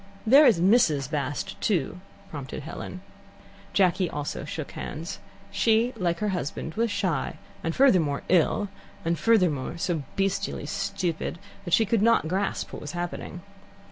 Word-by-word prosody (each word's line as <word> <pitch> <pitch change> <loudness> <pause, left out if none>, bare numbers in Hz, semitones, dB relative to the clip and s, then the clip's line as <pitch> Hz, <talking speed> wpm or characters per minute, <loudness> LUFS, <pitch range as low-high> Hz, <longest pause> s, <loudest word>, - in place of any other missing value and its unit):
"There 275 +6 +8
is 225 -8 +4
Mrs. 165 - +3
Bast, 145 -2 -3
too," 180 - 0 0.3
prompted 140 -1 -6
Helen. 175 +3 -7 0.7
Jacky 185 -2 +2
also 145 -1 -4
shook 155 0 -5
hands. 165 +6 -6 0.3
She, 230 +3 +2
like 175 -5 0
her 210 - +1
husband, 160 -3 -3
was 230 +5 +1
shy, 180 -9 -1 0.3
and, 165 0 -2
furthermore, 180 - +3
ill, 185 +3 +2 0.4
and 165 0 0
furthermore, 175 - +2
so 165 -2 -1
bestially 195 0 -1
stupid 195 -5 -2 0.3
that 175 - -3
she 225 - +3
could 220 0 +1
not 230 -7 +4
grasp 190 +4 -2
what - - -6
was 150 - -6
happening. 175 0 -5
180 Hz, 140 wpm, -26 LUFS, 155-205 Hz, 0.7 s, There